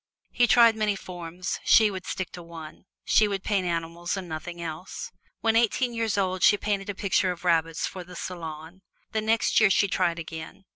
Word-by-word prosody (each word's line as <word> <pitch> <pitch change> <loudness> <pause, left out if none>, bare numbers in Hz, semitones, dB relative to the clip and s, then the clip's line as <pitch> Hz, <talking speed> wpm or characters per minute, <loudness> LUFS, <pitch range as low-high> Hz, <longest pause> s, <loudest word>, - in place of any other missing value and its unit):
He 245 - +3
had - - -5
tried 230 -2 +6
many 215 -2 0
forms; 180 -1 -6
she 220 -2 +6
would 185 -1 -7
stick 185 -2 -4
to 175 - -9
one. 165 0 -11 0.2
She 215 - +4
would 195 -2 -3
paint 195 -4 0
animals 170 +2 -3
and 190 -2 -6
nothing 170 +2 -6
else. 170 +2 -6 0.3
When 225 0 +2
eighteen 235 +2 +2
years 225 -3 -1
old, 185 -2 0
she 205 - +6
painted 205 -1 -2
a 205 - -3
picture 190 -1 +1
of 180 0 -8
rabbits, 165 -1 +1
for 185 - -6
the 180 +1 -12
Salon. 165 0 -7 0.3
The 220 - 0
next 225 +1 +2
year 215 -2 +5
she 200 +1 +3
tried 170 -2 0
again. 165 +3 -8
185 Hz, 200 wpm, -26 LUFS, 170-210 Hz, 0.3 s, tried